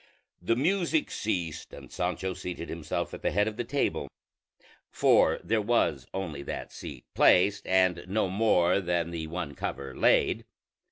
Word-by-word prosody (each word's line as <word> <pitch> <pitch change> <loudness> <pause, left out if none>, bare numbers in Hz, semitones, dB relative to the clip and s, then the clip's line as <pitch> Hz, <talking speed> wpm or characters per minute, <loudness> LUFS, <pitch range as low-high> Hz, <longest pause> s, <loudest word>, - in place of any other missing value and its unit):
The 105 +6 +1
music 165 +3 +1
ceased, 90 -7 -3
and - - -11
Sancho 90 +1 -2
seated 90 -2 -6
himself 80 -2 -3
at - - -7
the - - +1
head 105 +2 +1
of 110 - -3
the 120 - -2
table; 140 +4 -1 0.8
for - - +4
there 110 0 +1
was 95 - +1
only 85 -7 -4
that 70 - -6
seat - - -9
placed, 100 +3 +4
and 95 -2 +3
no 100 +1 +1
more 95 -2 +3
than 85 -2 -1
the 80 -2 -4
one 85 -3 -4
cover 70 -1 -5
laid. - - +3
90 Hz, 155 wpm, -28 LUFS, 85-110 Hz, 0.8 s, for